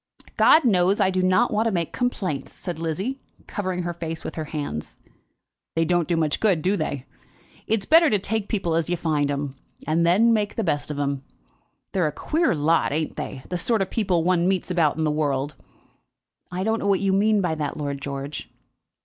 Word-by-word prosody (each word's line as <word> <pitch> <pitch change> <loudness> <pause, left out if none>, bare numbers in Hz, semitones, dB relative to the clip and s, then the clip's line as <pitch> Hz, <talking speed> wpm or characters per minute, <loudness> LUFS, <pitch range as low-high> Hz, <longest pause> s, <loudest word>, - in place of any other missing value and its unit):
"God 315 - +6
knows 190 -2 +3
I 190 -2 +3
do 185 0 0
not 185 +6 +3
want 220 +2 +2
to - - +1
make 170 -4 -2
complaints," 190 - -2
said 175 -4 -6
Lizzie, 190 - -2 0.3
covering 185 -3 -3
her 175 0 -3
face 165 -1 -5
with - - -5
her 155 - -4
hands. 145 - -5 0.8
"They 165 0 +2
don't 175 -2 +1
do 170 - +1
much 155 -2 0
good; 190 -8 +2
do 190 +3 +2
they? 145 -6 -3 0.6
It's 215 -3 0
better 325 0 +6
to 210 - +3
take 205 +1 -2
people 185 -7 -1
as 165 0 +1
you 175 - 0
find 150 -4 0
'em, 140 -1 -3 0.3
and 160 +2 +1
then 205 +8 +4
make 210 -2 0
the 225 - -1
best 150 -6 -1
of 150 - -4
'em. 140 -1 -1 0.7
They're 180 -5 +1
a - - -2
queer 315 - 0
lot; 160 +3 +2
ain't 155 +2 -2
they, 130 - -6
the 180 - -2
sort 225 -1 +2
of 190 - -8
people 190 -7 +1
one 175 0 +2
meets 190 -1 0
about 160 -4 +2
in 160 - 0
the 155 - +2
world?" 145 -1 -1 1.0
"I 180 +1 -2
don't 220 +2 +1
know - - -2
what 195 -2 +3
you 195 -1 +1
mean 210 +2 +3
by 180 -4 0
that, 150 -2 -3
Lord 140 -2 -3
George." 140 +1 -5
175 Hz, 210 wpm, -24 LUFS, 150-200 Hz, 1.0 s, God